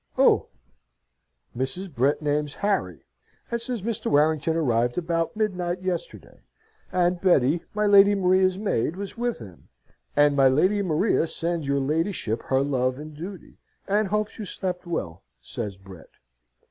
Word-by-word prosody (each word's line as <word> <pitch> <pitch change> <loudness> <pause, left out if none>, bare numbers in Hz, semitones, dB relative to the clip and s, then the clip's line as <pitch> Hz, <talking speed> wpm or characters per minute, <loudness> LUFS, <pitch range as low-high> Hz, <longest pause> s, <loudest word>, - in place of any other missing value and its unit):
Who?" - - +4 1.1
Mrs. 155 +8 -3
Brett 140 +5 +1
names 150 0 -1
Harry, 200 -1 -1 0.5
and 235 0 -1
says 235 -4 -3
Mr. 225 -1 -2
Warrington 155 +2 +2
arrived 120 -6 +1
about 165 0 -1
midnight 185 -4 -1
yesterday 180 -2 -5 0.5
and 180 -1 +1
Betty, 165 -3 +3
my 210 0 +1
Lady 200 0 +6
Maria's 185 -1 +3
maid, 185 - -1
was 195 0 -6
with 240 0 -2
him. 95 -7 -13 0.5
"And 145 0 +4
my 135 -1 +5
Lady 185 +10 +3
Maria 170 0 +1
sends 165 -2 -2
your 140 0 +1
ladyship 150 - -1
her 130 0 +2
love 130 -2 0
and 150 +1 -9
duty, 180 +4 -9 0.3
and 205 +1 +2
hopes 210 +3 -2
you 215 - -4
slept 180 -2 -4
well," 85 - -4 0.2
says 105 -5 -6
Brett. 95 -3 -14
170 Hz, 145 wpm, -25 LUFS, 140-195 Hz, 1.1 s, Lady